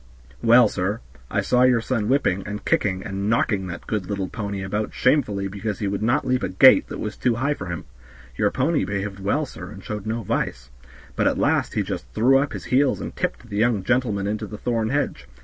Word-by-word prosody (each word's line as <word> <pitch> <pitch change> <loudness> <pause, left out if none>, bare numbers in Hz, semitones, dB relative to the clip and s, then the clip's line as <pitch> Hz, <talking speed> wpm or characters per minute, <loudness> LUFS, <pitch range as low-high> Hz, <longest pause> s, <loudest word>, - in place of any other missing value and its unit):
"Well, 120 0 +6
sir, 100 +2 -2 0.3
I - - 0
saw 125 - +2
your 125 -2 +5
son 115 -2 -1
whipping, 130 -8 +2
and 105 +1 -6
kicking, 95 -2 +1
and 100 0 -3
knocking 110 -6 +1
that 90 - -7
good 105 -4 -2
little 100 -2 -2
pony 100 -3 -4
about 105 +3 -3
shamefully 110 -8 +2
because 100 +1 -4
he 105 - -2
would 100 +1 -2
not 120 +6 +1
leap 130 0 +1
a - - -1
gate 95 +8 +6
that - - -6
was 105 0 -4
too 125 -2 +1
high 135 +5 0
for 95 -9 -7
him. 85 -2 -5 0.5
The - - +2
pony 145 +5 +1
behaved 100 0 -3
well, 100 +11 0
sir, - - -9
and 95 -2 -11
showed 105 -1 -5
no 115 +1 -2
vice; - - -3 0.4
but - - +2
at - - +1
last - - +1
he - - +1
just - - -5
threw 130 +5 +5
up 145 +1 -1
his - - -6
heels 130 +1 +2
and - - -6
tipped 120 - -3
the 100 - -3
young 110 -3 +2
gentleman 110 -3 0
into 105 +1 -2
the 105 - -8
thorn 115 -2 -1
hedge. 145 +3 -2
105 Hz, 220 wpm, -23 LUFS, 100-125 Hz, 0.5 s, Well